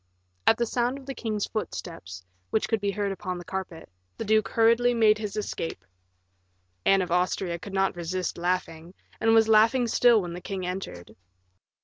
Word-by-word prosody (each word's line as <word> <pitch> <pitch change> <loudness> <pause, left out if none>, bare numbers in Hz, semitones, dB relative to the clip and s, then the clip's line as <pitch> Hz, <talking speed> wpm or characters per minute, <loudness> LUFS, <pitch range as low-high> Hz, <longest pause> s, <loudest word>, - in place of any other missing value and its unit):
At 225 - +6
the 235 - +1
sound 245 +3 -1
of 275 - -12
the 270 - -5
king's 215 -5 -2
footsteps, 95 - -6 0.2
which 220 - 0
could 225 -3 0
be 200 - 0
heard 200 0 -1
upon 185 -1 -4
the 175 - -9
carpet, 185 -3 -6 0.3
the - - -4
duke 215 0 +3
hurriedly 235 +2 +3
made 215 -2 +4
his 210 -2 -4
escape. 165 - -4 1.0
Anne 195 -1 +5
of 180 - -6
Austria 180 0 0
could 195 +2 -8
not 195 -1 +1
resist 175 +1 -3
laughing, 175 -1 -2 0.2
and 225 0 +4
was 225 -1 +5
laughing 225 +3 +5
still 235 0 +4
when 175 -3 -5
the 175 - -7
king 185 0 -4
entered. 180 - -6
195 Hz, 175 wpm, -26 LUFS, 180-225 Hz, 1.0 s, At